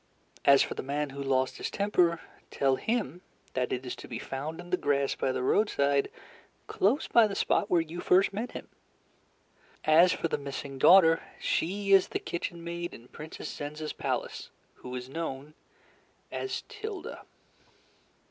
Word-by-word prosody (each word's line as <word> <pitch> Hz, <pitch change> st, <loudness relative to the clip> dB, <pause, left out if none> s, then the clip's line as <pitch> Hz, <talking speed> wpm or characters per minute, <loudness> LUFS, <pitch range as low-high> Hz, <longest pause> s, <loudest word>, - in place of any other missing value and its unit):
As 140 Hz, -1 st, +7 dB
for -, -, -4 dB
the -, -, -4 dB
man 145 Hz, +1 st, -2 dB
who 140 Hz, +1 st, -6 dB
lost 130 Hz, -1 st, 0 dB
his -, -, -3 dB
temper, 180 Hz, -5 st, +2 dB, 0.3 s
tell 135 Hz, -1 st, +2 dB
him 210 Hz, -, -2 dB, 0.3 s
that 125 Hz, -1 st, -1 dB
it 125 Hz, +1 st, -2 dB
is 125 Hz, -, -4 dB
to -, -, -10 dB
be 120 Hz, -, -5 dB
found 145 Hz, +7 st, -5 dB
in 175 Hz, 0 st, -10 dB
the -, -, +4 dB
grass 140 Hz, -4 st, +1 dB
by 130 Hz, -, -1 dB
the 125 Hz, -, -2 dB
roadside 140 Hz, -5 st, +2 dB, 0.6 s
close 245 Hz, +11 st, +1 dB
by 230 Hz, -2 st, +5 dB
the 200 Hz, -, -5 dB
spot 205 Hz, -, +1 dB
where 175 Hz, -4 st, +4 dB
you 165 Hz, +2 st, -7 dB
first 190 Hz, +2 st, +4 dB
met 230 Hz, +5 st, -4 dB
him. -, -, -7 dB, 1.2 s
As 165 Hz, +4 st, +6 dB
for -, -, -1 dB
the 155 Hz, -, -2 dB
missing 140 Hz, -1 st, -6 dB
daughter, 165 Hz, 0 st, +7 dB, 0.2 s
she 200 Hz, +4 st, -1 dB
is 195 Hz, -1 st, +6 dB
the -, -, -2 dB
kitchen 170 Hz, 0 st, -5 dB
maid 170 Hz, 0 st, -5 dB
in 120 Hz, +2 st, -15 dB
Princess 155 Hz, +1 st, -8 dB
Zenza's 150 Hz, +1 st, -5 dB
palace, -, -, -3 dB, 0.2 s
who 125 Hz, 0 st, -8 dB
is 125 Hz, 0 st, -5 dB
known 145 Hz, -1 st, -5 dB, 0.8 s
as 395 Hz, -, -3 dB
Tilda." 430 Hz, -3 st, -7 dB
160 Hz, 165 wpm, -29 LUFS, 140-180 Hz, 1.2 s, As